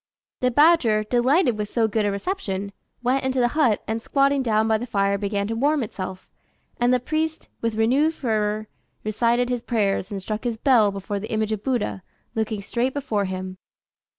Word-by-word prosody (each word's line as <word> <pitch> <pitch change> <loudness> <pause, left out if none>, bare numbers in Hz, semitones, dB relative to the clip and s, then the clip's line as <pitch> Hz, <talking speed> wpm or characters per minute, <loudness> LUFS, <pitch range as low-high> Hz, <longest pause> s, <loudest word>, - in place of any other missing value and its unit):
The 250 - +2
badger, 250 -6 +4
delighted 245 - +2
with 210 -1 -2
so 230 -2 +2
good 215 -1 0
a - - +1
reception, 200 - -3 0.3
went 255 +2 +1
into 260 0 0
the 240 -1 +3
hut, 250 -7 +2
and 225 +1 -2
squatting 275 +2 +2
down 220 -3 +2
by 220 -1 +2
the 245 - -5
fire 200 -3 +1
began 200 0 -1
to 225 - -1
warm 285 +3 +2
itself; 190 -3 -6 0.5
and 240 +1 +3
the 250 - +3
priest, 315 +4 -2
with 230 -1 -1
renewed 270 +9 +2
fervour, 215 -3 -1 0.4
recited 235 +3 +1
his 245 -1 -1
prayers 205 -6 0
and 200 - -4
struck 215 +3 -4
his 235 -2 -2
bell 230 -4 +4
before 200 +1 -4
the 215 - -7
image 220 -1 0
of 215 -1 -3
Buddha, 215 - -1 0.3
looking 220 -3 -2
straight 250 +5 -1
before 230 -8 -1
him. 185 0 -5
225 Hz, 185 wpm, -23 LUFS, 205-255 Hz, 0.5 s, badger